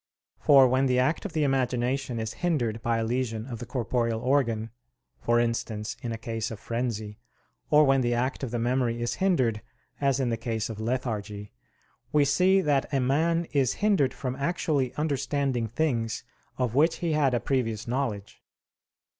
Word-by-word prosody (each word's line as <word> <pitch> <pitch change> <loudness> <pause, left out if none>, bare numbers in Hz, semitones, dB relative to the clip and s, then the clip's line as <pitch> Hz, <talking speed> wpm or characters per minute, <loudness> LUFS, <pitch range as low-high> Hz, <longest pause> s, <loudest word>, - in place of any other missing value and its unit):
For 135 -2 +7
when 130 +2 +2
the 125 -1 +2
act 130 +9 +1
of 200 - -5
the 155 - +1
imagination 130 -1 0
is 110 -1 -3
hindered 120 -11 0
by 115 0 0
a 115 - 0
lesion 115 -1 -2
of 120 -4 -7
the 120 - -7
corporeal 115 -2 -1
organ, 115 -4 0 0.5
for 120 0 +2
instance 115 -2 -2
in 120 -3 -4
a 115 - -3
case 115 -1 -4
of 110 - -7
frenzy; 115 -3 -3 0.5
or 150 0 +6
when 135 -2 +4
the 120 -1 +1
act 130 +3 -1
of 135 - -3
the 120 - -2
memory 120 0 0
is 120 0 -1
hindered, 130 - +2 0.4
as 140 -1 +2
in 130 -3 +1
the 115 - -1
case 115 -1 -3
of 110 - -8
lethargy, 110 -4 -3 0.6
we 150 -1 +4
see 180 +7 +4
that 145 -5 +1
a 140 - +1
man 160 +6 +1
is 135 -3 +2
hindered 150 -12 +2
from 130 -1 -3
actually 145 -4 0
understanding 140 -4 -1
things 115 -3 -1 0.3
of 125 -3 -1
which 155 +5 +3
he 170 -2 -2
had 145 -4 +2
a - - +1
previous 115 -6 -1
knowledge. 120 -5 -3
125 Hz, 175 wpm, -27 LUFS, 115-140 Hz, 0.6 s, For